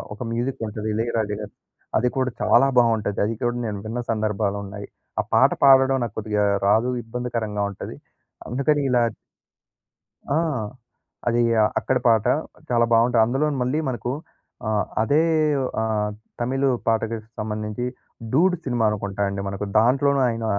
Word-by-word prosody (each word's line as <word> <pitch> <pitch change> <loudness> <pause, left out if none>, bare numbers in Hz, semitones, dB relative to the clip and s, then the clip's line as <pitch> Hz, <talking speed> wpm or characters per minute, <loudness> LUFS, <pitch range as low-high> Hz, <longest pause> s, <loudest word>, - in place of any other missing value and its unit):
ఒక - - -21
మ్యూజికుంటది. 115 -3 -3
'ఇళయ‌రాజు' 110 -2 -1
గా‌రిది 105 -1 -8 0.4
అది 125 - +2
కూడా 130 -1 +1
చాలా 130 +3 +5
బావుంటది. 110 -4 +2
అది 115 - -1
కూడా 120 0 0
నేను 105 -2 -3
విన్న 115 +3 -3
సందర్భాలున్నాయి. 100 -2 -2 0.3
ఆ - - +5
పాట - - +5
పాడడం 135 -1 +6
నాకు 115 -4 -5
కొద్దిగా 105 -1 0 0.2
రాదు. 110 +4 +3
ఇబ్బందికరంగా 115 -3 -3
ఉంటది. - - -8 0.5
అందుకని 140 +4 +1
ఇలా 125 -1 +3 1.3
ఆ! - - +3 0.9
అది 120 0 +2 0.4
అక్కడి 130 -1 0
పాట. 110 -2 +4 0.5
చాలా 120 -1 +4
బావుoటాయి. 115 0 +4
అందులోను 140 +4 0
మళ్ళీ 130 +5 0
మనకు 120 0 -3 0.6
ఆహ్, 105 -3 +1 0.2
అదే 145 +8 +3 0.6
ఆహ్, 110 -1 0 0.3
తమిళు 135 +3 +1 0.2
పాటకి 115 0 +1 0.2
సంబంధించి 105 +2 -3 0.5
'డూడ్' 180 +8 +3
సినిమా 120 -4 0
అనుకుంటా 100 -1 -3
అండి 100 0 -3
మనకు. 100 +1 -4
దాంట్లోనూ 135 +4 +3
ఆయన 115 -1 -3
115 Hz, 130 wpm, -23 LUFS, 105-125 Hz, 1.3 s, పాడడం